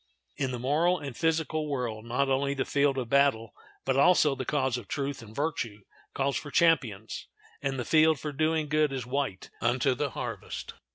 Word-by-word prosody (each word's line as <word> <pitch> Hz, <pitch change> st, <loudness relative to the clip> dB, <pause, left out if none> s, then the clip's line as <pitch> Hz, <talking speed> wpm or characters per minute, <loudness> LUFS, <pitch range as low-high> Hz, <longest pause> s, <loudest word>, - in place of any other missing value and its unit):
In 135 Hz, -, -1 dB
the 125 Hz, -, -3 dB
moral 155 Hz, +8 st, +2 dB
and 140 Hz, -6 st, -7 dB
physical 160 Hz, -1 st, 0 dB
world 120 Hz, -5 st, -3 dB
not 125 Hz, +4 st, 0 dB
only 140 Hz, +1 st, +1 dB
the 135 Hz, -, -1 dB
field 140 Hz, -1 st, +2 dB
of 125 Hz, -3 st, -2 dB
battle 135 Hz, -4 st, +2 dB, 0.3 s
but 135 Hz, 0 st, +1 dB
also 150 Hz, 0 st, +5 dB
the 130 Hz, -1 st, -4 dB
cause 130 Hz, -4 st, 0 dB
of 120 Hz, -5 st, -6 dB
truth 140 Hz, +1 st, -3 dB
and 110 Hz, -1 st, -12 dB
virtue 130 Hz, -9 st, -2 dB, 0.3 s
calls 140 Hz, 0 st, +1 dB
for 145 Hz, -, -6 dB
champions, 130 Hz, -9 st, +1 dB, 0.3 s
and 135 Hz, -1 st, -1 dB
the 125 Hz, -, -3 dB
field 160 Hz, -1 st, +4 dB
for 150 Hz, -, -4 dB
doing 155 Hz, +2 st, +1 dB
good 150 Hz, 0 st, +2 dB
is 130 Hz, -3 st, -3 dB
white 130 Hz, -6 st, -3 dB
unto 125 Hz, +2 st, +2 dB
the 145 Hz, +3 st, -1 dB
harvest. -, -, -6 dB
140 Hz, 185 wpm, -28 LUFS, 125-150 Hz, 0.3 s, also